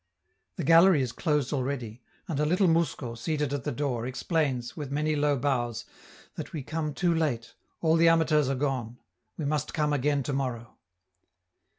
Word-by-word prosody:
The - - -4
gallery 165 -2 +6
is 125 - -3
closed 150 -2 0
already, 125 -4 -3 0.3
and 155 -5 -2
a 150 - +2
little 185 +4 +3
mousko, 160 -7 0
seated 145 +3 -2
at 140 -3 -3
the 150 - -1
door, 125 -3 -2
explains, 130 -3 -1
with 145 -3 -5
many 150 +2 0
low 145 -1 +2
bows, 120 -4 -1 0.5
that - - -7
we 150 -5 -4
come 155 0 -3
too 175 -2 +2
late, 120 -9 -1 0.3
all 160 0 +3
the 165 0 +6
amateurs 155 -4 +3
are 135 - 0
gone; 125 -4 -2 0.4
we 155 - -3
must 150 -1 -1
come 150 -1 +1
again 145 0 +1
tomorrow. 125 -4 -3
145 Hz, 170 wpm, -28 LUFS, 125-155 Hz, 0.5 s, gallery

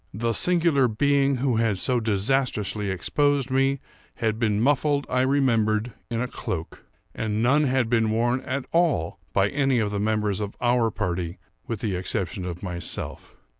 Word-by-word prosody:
The 115 +2 0
singular 165 -4 +3
being 140 +4 +2
who 125 -2 0
had 110 -4 +1
so 125 +5 +1
disastrously 110 -1 0
exposed 140 - 0
me, 135 +1 +2 0.4
had 110 -2 -1
been 105 -3 +1
muffled, 145 +3 +2
I 125 0 +1
remembered, 120 -5 +1 0.2
in 115 -1 -2
a 125 - -1
cloak; 85 -8 -6 0.3
and 110 0 -1
none 145 +5 +4
had 130 -3 +1
been 115 -1 +2
worn 120 +3 +1
at 130 0 -3
all 165 - +1
by 100 +2 +2
any 135 -1 +1
of 105 -3 0
the 100 - -2
members 105 -1 0
of 105 -1 -4
our 120 -2 +2
party 90 -4 -3 0.3
with 115 -4 -4
the 105 -4 -1
exception 90 +2 -3
of 90 0 -6
myself. 90 -2 -4
115 Hz, 165 wpm, -25 LUFS, 105-135 Hz, 0.4 s, none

